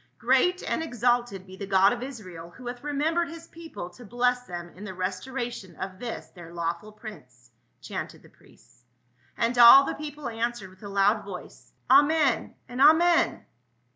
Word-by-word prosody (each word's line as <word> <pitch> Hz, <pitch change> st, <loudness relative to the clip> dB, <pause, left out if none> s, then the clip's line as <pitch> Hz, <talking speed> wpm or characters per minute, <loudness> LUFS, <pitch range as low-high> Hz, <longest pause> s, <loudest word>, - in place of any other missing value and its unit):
" -, -, -43 dB
Great 365 Hz, 0 st, +2 dB
and -, -, -1 dB
exalted 240 Hz, -, 0 dB
be 190 Hz, 0 st, -12 dB
the 200 Hz, +1 st, -7 dB
God 195 Hz, +2 st, +4 dB
of 240 Hz, -, -6 dB
Israel, 185 Hz, -11 st, -8 dB
who 245 Hz, +8 st, -14 dB
hath 245 Hz, +1 st, -6 dB
remembered 315 Hz, +4 st, 0 dB
his 330 Hz, 0 st, -10 dB
people 325 Hz, -, -9 dB
to 245 Hz, -, -14 dB
bless 245 Hz, +2 st, 0 dB
them 175 Hz, -1 st, -7 dB
in 190 Hz, -, -13 dB
the 200 Hz, -3 st, -6 dB
restora 195 Hz, +8 st, -4 dB
tion 185 Hz, -4 st, -11 dB
of 190 Hz, +2 st, -7 dB
this 240 Hz, -1 st, -6 dB
their 175 Hz, -2 st, -13 dB
lawful 170 Hz, +4 st, -4 dB
prince 125 Hz, -, -13 dB
!" -, -, -45 dB
chanted -, -, -6 dB
the -, -, -16 dB
priests. 120 Hz, -, -24 dB, 0.5 s
And 235 Hz, +1 st, 0 dB
all 240 Hz, +4 st, +10 dB
the -, -, -2 dB
people 295 Hz, -2 st, -7 dB
answered 230 Hz, -4 st, -3 dB
with 185 Hz, -, -21 dB
a 205 Hz, -, -8 dB
loud 200 Hz, +2 st, +2 dB
voice, 195 Hz, -3 st, -10 dB
"Amen, 285 Hz, 0 st, +3 dB
and 245 Hz, +2 st, -4 dB
Amen 330 Hz, +4 st, +4 dB
235 Hz, 180 wpm, -26 LUFS, 190-270 Hz, 0.5 s, all